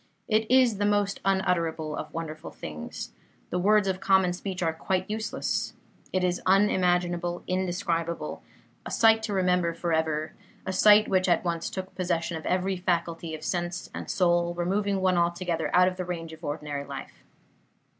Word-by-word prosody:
It 220 Hz, 0 st, +1 dB
is 250 Hz, -5 st, +4 dB
the 205 Hz, -, +2 dB
most 205 Hz, -1 st, +1 dB
unutterable 170 Hz, -5 st, 0 dB
of 155 Hz, -, -6 dB
wonderful 160 Hz, -1 st, -6 dB
things. 75 Hz, 0 st, -7 dB, 0.4 s
The 180 Hz, -, 0 dB
words 210 Hz, +2 st, +4 dB
of 190 Hz, -1 st, -1 dB
common 190 Hz, -2 st, +3 dB
speech 185 Hz, 0 st, -4 dB
are 165 Hz, -1 st, +1 dB
quite 185 Hz, +3 st, -1 dB
useless. 220 Hz, +1 st, -2 dB, 0.4 s
It 185 Hz, -1 st, 0 dB
is 180 Hz, -1 st, 0 dB
unimaginable, 180 Hz, -3 st, +2 dB
indescribable; 170 Hz, -, -2 dB, 0.4 s
a -, -, -7 dB
sight 225 Hz, -1 st, +4 dB
to 220 Hz, -2 st, -3 dB
remember 180 Hz, -3 st, +1 dB
forever; 160 Hz, -2 st, -1 dB, 0.3 s
a 190 Hz, -, -2 dB
sight 210 Hz, +2 st, +6 dB
which 185 Hz, -1 st, +2 dB
at 175 Hz, -, +2 dB
once 170 Hz, -1 st, -1 dB
took 190 Hz, 0 st, -6 dB
possession 175 Hz, -2 st, -1 dB
of 160 Hz, -, -6 dB
every 185 Hz, +1 st, 0 dB
faculty 170 Hz, -2 st, -1 dB
of 155 Hz, -, -10 dB
sense 175 Hz, 0 st, -3 dB
and -, -, -6 dB
soul, 175 Hz, -2 st, +2 dB
removing 195 Hz, +3 st, 0 dB
one 185 Hz, -2 st, +3 dB
altogether 170 Hz, -1 st, 0 dB
out 180 Hz, 0 st, +5 dB
of 185 Hz, 0 st, -2 dB
the 185 Hz, -, -2 dB
range 165 Hz, -2 st, -5 dB
of 160 Hz, +1 st, -13 dB
ordinary 145 Hz, -1 st, -4 dB
life. 140 Hz, -1 st, -9 dB
180 Hz, 165 wpm, -27 LUFS, 165-190 Hz, 0.4 s, sight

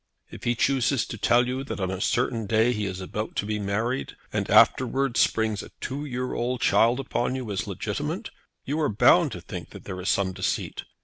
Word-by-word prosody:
If -, -, -10 dB
he 120 Hz, -, +2 dB
chooses 135 Hz, 0 st, +2 dB
to 115 Hz, -, -7 dB
tell 120 Hz, +3 st, +4 dB
you 130 Hz, +2 st, -2 dB
that 110 Hz, -5 st, -5 dB
on 95 Hz, -1 st, -1 dB
a 95 Hz, 0 st, -4 dB
certain 115 Hz, -3 st, 0 dB
day 115 Hz, +3 st, +3 dB
he 105 Hz, -3 st, -2 dB
is 95 Hz, 0 st, -5 dB
about 105 Hz, +4 st, -4 dB
to -, -, -1 dB
be 105 Hz, 0 st, -2 dB
married, 110 Hz, +6 st, -2 dB, 0.2 s
and -, -, -1 dB
afterwards 130 Hz, -1 st, +4 dB
springs 110 Hz, -2 st, +2 dB
a -, -, -10 dB
two 140 Hz, +3 st, -4 dB
year 125 Hz, -2 st, -3 dB
old 125 Hz, +1 st, -1 dB
child 120 Hz, +2 st, +3 dB
upon 130 Hz, -1 st, -1 dB
you 125 Hz, -5 st, -4 dB
as 95 Hz, -3 st, -2 dB
legitimate, -, -, -3 dB, 0.3 s
you 145 Hz, +4 st, -1 dB
are 150 Hz, -, +2 dB
bound 105 Hz, -, +5 dB
to -, -, -7 dB
think -, -, -7 dB
that -, -, -11 dB
there 90 Hz, -1 st, -6 dB
is 90 Hz, -, -1 dB
some 95 Hz, -1 st, +1 dB
deceit. 95 Hz, 0 st, -2 dB
115 Hz, 210 wpm, -26 LUFS, 100-125 Hz, 0.3 s, bound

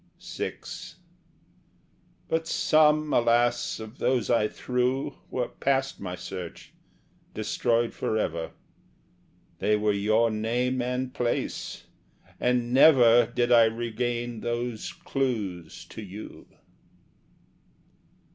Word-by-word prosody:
VI -, -, -5 dB, 1.7 s
But 160 Hz, 0 st, -1 dB
some, 155 Hz, -1 st, +3 dB
alas, 120 Hz, 0 st, +2 dB
of 110 Hz, +2 st, -10 dB
those 125 Hz, -5 st, +1 dB
I 115 Hz, -3 st, +3 dB
threw 125 Hz, +4 st, -1 dB
Were 125 Hz, -1 st, -2 dB
past 135 Hz, 0 st, -1 dB
my 90 Hz, -2 st, -5 dB
search, 90 Hz, -1 st, -8 dB, 0.6 s
destroyed 115 Hz, 0 st, 0 dB
for 110 Hz, -, -1 dB
ever: 85 Hz, -6 st, -2 dB, 1.1 s
They 105 Hz, -, +2 dB
were 105 Hz, 0 st, +1 dB
your 110 Hz, +3 st, +2 dB
name 120 Hz, +4 st, 0 dB
and 125 Hz, +1 st, -2 dB
place; 120 Hz, -4 st, -2 dB, 0.6 s
and 125 Hz, -1 st, +1 dB
never 125 Hz, -4 st, +7 dB
Did 120 Hz, 0 st, 0 dB
I 115 Hz, -1 st, +7 dB
regain 120 Hz, +1 st, -2 dB
those 120 Hz, -1 st, -3 dB
clues 115 Hz, -, -3 dB
to -, -, -8 dB
you. 105 Hz, +1 st, -10 dB
120 Hz, 100 wpm, -27 LUFS, 110-125 Hz, 1.7 s, never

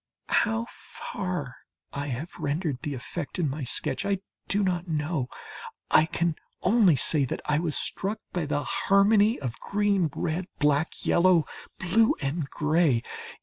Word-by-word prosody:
How 225 Hz, +1 st, +2 dB
far 180 Hz, -, -5 dB, 0.4 s
I 140 Hz, +1 st, -3 dB
have 140 Hz, +6 st, -5 dB
rendered 145 Hz, -3 st, -2 dB
the 145 Hz, -2 st, -3 dB
effect 145 Hz, +7 st, -6 dB
in 175 Hz, -4 st, +1 dB
my 140 Hz, +2 st, -3 dB
sketch, 125 Hz, -, -1 dB
I 200 Hz, 0 st, +1 dB, 0.3 s
do 205 Hz, +1 st, +2 dB
not 180 Hz, -1 st, -1 dB
know. 155 Hz, -4 st, -1 dB, 0.6 s
I 155 Hz, -, +6 dB
can 170 Hz, -2 st, -1 dB, 0.3 s
only 200 Hz, -4 st, +5 dB
say 145 Hz, +1 st, +2 dB
that -, -, -3 dB
I 150 Hz, 0 st, +2 dB
was 165 Hz, -3 st, +1 dB
struck 200 Hz, +3 st, -2 dB, 0.2 s
by 175 Hz, -4 st, -1 dB
the 145 Hz, 0 st, 0 dB
harmony 205 Hz, +1 st, +3 dB
of 125 Hz, -4 st, -5 dB
green, 200 Hz, -4 st, +1 dB
red, 175 Hz, +2 st, -2 dB
black, 150 Hz, +2 st, +1 dB
yellow, 175 Hz, -2 st, +4 dB, 0.3 s
blue, 220 Hz, +5 st, +3 dB
and 140 Hz, 0 st, -2 dB
gray. 150 Hz, -5 st, +2 dB
165 Hz, 145 wpm, -27 LUFS, 145-190 Hz, 0.6 s, I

